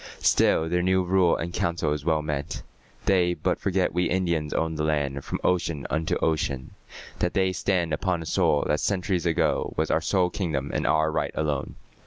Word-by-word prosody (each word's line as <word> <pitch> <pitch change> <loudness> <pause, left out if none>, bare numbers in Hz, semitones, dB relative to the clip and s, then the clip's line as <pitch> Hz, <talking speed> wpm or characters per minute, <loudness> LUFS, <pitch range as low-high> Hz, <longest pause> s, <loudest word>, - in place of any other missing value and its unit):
Still 80 - +3
their 90 +1 +1
new 95 +1 +2
rule 90 -1 +3
and 85 +1 -4
council 85 -4 0
is 75 -2 -4
well 80 -1 +1
meant. 75 -2 -4 0.4
They 90 -2 +3
but - - -1
forget 95 -1 0
we 90 +1 +1
Indians 85 -5 0
owned 80 -1 -1
the - - +1
land 70 -3 -1
From - - -4
ocean 85 -5 0
unto 80 +2 0
ocean; 70 -5 -1 0.5
that 90 - -1
they 95 -1 +2
stand 90 -3 0
Upon 85 +2 -1
a - - -10
soil 75 -1 +2
that 75 - +1
centuries 90 -3 0
agone 80 - 0
Was 80 0 0
our 80 - +2
sole 90 +1 +1
kingdom 75 -8 -2
and - - 0
our 80 0 +2
right - - -1
alone. 75 -3 -2
80 Hz, 190 wpm, -26 LUFS, 75-90 Hz, 0.5 s, Still